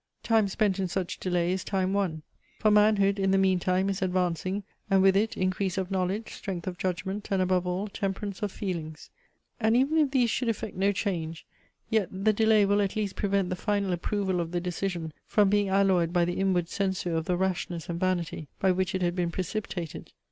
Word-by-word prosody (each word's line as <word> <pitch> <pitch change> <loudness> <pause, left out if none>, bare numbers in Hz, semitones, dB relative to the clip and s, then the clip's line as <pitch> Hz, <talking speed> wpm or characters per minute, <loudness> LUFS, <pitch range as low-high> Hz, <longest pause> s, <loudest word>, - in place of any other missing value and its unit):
Time 225 -3 +3
spent 195 0 0
in 190 - 0
such 180 0 -3
delay 175 -1 0
is 185 0 -1
time 190 -1 0
won: 180 -6 -1 0.3
for 215 - +3
manhood 210 -1 +4
in 195 0 +2
the 195 - +4
meantime 185 0 +2
is 195 0 -2
advancing, 185 +1 0 0.3
and 195 -1 +4
with 195 0 +5
it 215 +3 +1
increase 185 +1 -1
of 190 0 -2
knowledge, 190 +3 -1
strength 180 -4 -5
of 180 -1 -5
judgment, 190 +3 -3
and 195 - +1
above 185 -1 +1
all, 185 +3 -1
temperance 200 0 -4
of 205 -2 -1
feelings. 165 -7 -5 0.5
And 220 +1 +3
even 285 +5 +3
if 295 -3 +3
these 250 -4 +2
should 245 0 0
effect 220 -1 -3
no 195 +2 +2
change, 170 -5 -3 0.5
yet 220 -5 +2
the 195 +3 +1
delay 220 -1 +4
will 205 +1 +3
at 195 -1 -1
least 210 -3 -2
prevent 195 -2 0
the - - 0
final 200 -1 0
approval 190 +1 -1
of 170 -1 -2
the 175 - +1
decision 175 -2 -3
from 205 -2 +3
being 205 -1 +2
alloyed 190 -3 +3
by 175 -1 +3
the 175 +1 -2
inward 185 -3 +1
censure 190 -2 -1
of 160 0 -1
the 180 0 0
rashness 180 -3 -2
and 170 -1 -3
vanity, 175 -4 -1
by 190 - +3
which 185 0 0
it 185 - -1
had 175 0 0
been 175 -2 0
precipitated. 180 -2 -5
190 Hz, 205 wpm, -28 LUFS, 180-200 Hz, 0.5 s, with